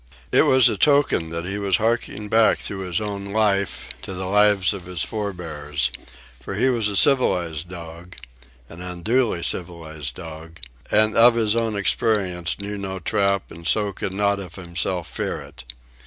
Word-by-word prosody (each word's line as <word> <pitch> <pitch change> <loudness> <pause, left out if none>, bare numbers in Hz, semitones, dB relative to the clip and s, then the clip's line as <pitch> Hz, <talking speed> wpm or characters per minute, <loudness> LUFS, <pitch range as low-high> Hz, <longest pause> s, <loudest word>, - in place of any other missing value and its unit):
It - - +5
was 130 -2 +6
a - - 0
token 140 - +3
that 85 +1 -4
he 100 +2 -3
was 100 -3 +2
harking 110 -2 -1
back 110 +1 +4
through 100 - -4
his 90 - 0
own 100 -2 -4
life 100 -1 0
to 95 - -6
the 95 +1 -4
lives 100 0 +3
of 95 -3 -8
his 90 -3 -2
forebears; 80 - -3 0.5
for - - -6
he 130 - +2
was 115 -4 +1
a 100 - -2
civilized 90 - +2
dog, 85 0 -10 0.5
an 85 +2 -11
unduly 90 +3 0
civilized 80 -6 -3
dog, 80 -1 -10 0.3
and 110 +1 +3
of 115 +1 +7
his 110 -2 +1
own 115 -2 0
experience 95 -4 0
knew 100 0 -5
no 95 -1 -4
trap 100 +2 0
and 85 0 -8
so 105 -2 +1
could 95 - -4
not 100 +1 +1
of 90 -3 -9
himself 90 -1 -3
fear - - -3
it. 60 - -10
95 Hz, 170 wpm, -22 LUFS, 85-105 Hz, 0.5 s, of